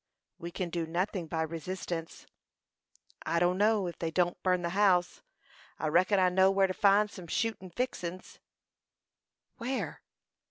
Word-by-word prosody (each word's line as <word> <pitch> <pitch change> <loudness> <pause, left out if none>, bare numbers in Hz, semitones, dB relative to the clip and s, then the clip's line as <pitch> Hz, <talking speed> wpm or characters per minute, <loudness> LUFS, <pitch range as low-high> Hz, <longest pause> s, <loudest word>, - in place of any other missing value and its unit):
"We 170 - -6
can 175 0 -4
do 165 -1 -2
nothing 180 +1 -2
by 160 +1 -1
resistance." 165 +1 -5 1.0
"I 170 - 0
dunno; 195 +4 +3
if 175 - -6
they 165 - -1
don't 175 +1 0
burn 180 -1 +1
the 170 - -1
house, 185 -2 +2 0.6
I 155 - -1
reckon 185 +5 +3
I 185 -1 +4
know 190 +1 +4
whar 195 0 +3
to 185 - -1
find 205 +1 +4
some 180 -4 -10
shootin' 190 0 -2
fixin's." 185 -4 -5 1.2
"Where?" 255 +2 -3
180 Hz, 145 wpm, -30 LUFS, 170-195 Hz, 1.2 s, I